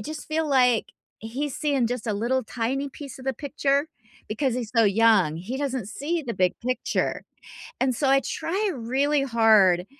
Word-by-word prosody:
just 310 +9 -7
feel 315 0 0
like, 250 -4 +3 0.3
he's 260 +6 -4
seeing 285 -5 +1
just 245 0 -4
a 215 - 0
little, 240 +5 0
tiny 255 +5 -2
piece 275 -2 -10
of - - -11
the 265 - 0
picture, 280 +1 0 0.4
because 235 +4 -1
he's 235 -4 -5
so 230 - +6
young, 200 -6 +4
he 205 +10 -5
doesn't 265 -6 -3
see 320 +8 -3
the 235 -6 -4
big 185 -1 +1
picture, 255 0 -1 0.6
and 260 -1 +2
so, 270 +4 0
I 275 0 +5
try 390 +9 -2
really 270 +5 0
hard 215 -7 +4
255 Hz, 175 wpm, -25 LUFS, 225-280 Hz, 0.6 s, so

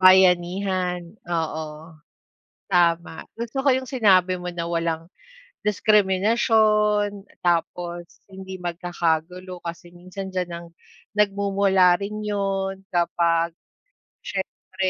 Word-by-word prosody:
Bayanihan, 185 -1 +4 0.2
oo. 160 -1 -3 0.7
Tama. 170 -3 +2 0.2
Gusto 235 +3 -3
ko 275 - +3
'yong 260 0 +2
sinabi 190 -8 +3
mo 180 - -4
na 170 -1 -4
walang 165 -1 -1 0.6
diskriminasyon, 210 0 +3 0.2
tapos 175 0 -2
hindi 190 0 -7
magkakagulo, 175 0 -2
kasi 170 0 -8
minsan 185 +2 -8
d'yan 180 -1 -1
ang 170 0 -7 0.5
nagmumula 195 -3 +3
rin 210 +2 -4
'yon 195 -2 -1
kapag, 170 -1 +1 0.7
siyempre, 190 -1 -3
185 Hz, 95 wpm, -24 LUFS, 175-200 Hz, 0.7 s, Bayanihan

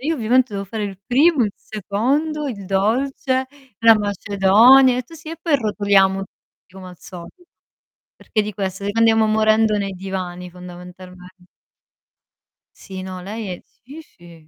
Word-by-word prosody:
Io 315 +5 -2
ovviamente 245 0 +1
devo 200 0 -4
fare 215 +2 -6
il 195 -2 -6
primo, 275 +1 +3
il 205 - -3
secondo, 275 - -2
il 200 -6 -7
dolce, 260 +6 -1 0.3
la 225 -1 +6
macedonia, 210 +6 +4
e 255 - -2
tu: 330 +7 -16
"Sì, 315 0 -12
e 330 - -7
poi 330 -3 0
rotoliamo 200 -4 +2
tutti 185 - -32
come 190 -1 -10
al 180 - -13
solito." 180 - -12 0.7
Perché 215 - -2
di 210 - -5
questo? 195 0 -4
Andiamo 225 0 +3
morendo 215 0 +2
nei 200 -1 -3
divani 180 -1 -6
fondamentalmen 180 0 -12 1.5
Sì, 190 -2 -9
no, 185 -1 -7
lei 210 +3 -6
è - - -21
sì, 280 +8 -14
sì, 170 - -18
210 Hz, 150 wpm, -20 LUFS, 190-250 Hz, 1.5 s, la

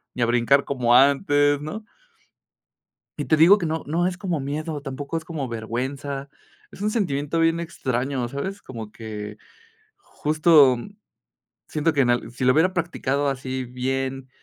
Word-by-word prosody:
ni 125 - 0
a - - +4
brincar 120 +4 +3
como 120 -3 +2
antes, 145 +1 +4
¿no? 210 +9 -6 1.3
Y - - -3
te 155 - +3
digo 170 +6 +7
que 185 - -3
no 160 0 -2
no 170 +4 +1
es 180 -1 -3
como 180 -6 -2
miedo, 150 +2 -4
tampoco 140 +2 -6
es 160 - -5
como 160 -5 -4
vergüenza. 135 +5 -4 0.4
Es - - -12
un 210 - 0
sentimiento 150 - -1
bien 165 0 +2
extraño, 130 -5 -2
¿sabes? 190 +11 -5
Como 110 -4 -8
que 105 -2 -7 0.6
justo, 155 - +4
mm, 120 - -8 0.8
siento 155 +2 0
que 145 -3 +2
en 125 - +2
al 120 -1 -1
si 130 +1 -3
lo 130 - +5
hubiera 170 +6 +3
practicado 145 -5 -1
así 130 -1 -3
bien 130 +1 -3
140 Hz, 160 wpm, -23 LUFS, 130-160 Hz, 1.3 s, digo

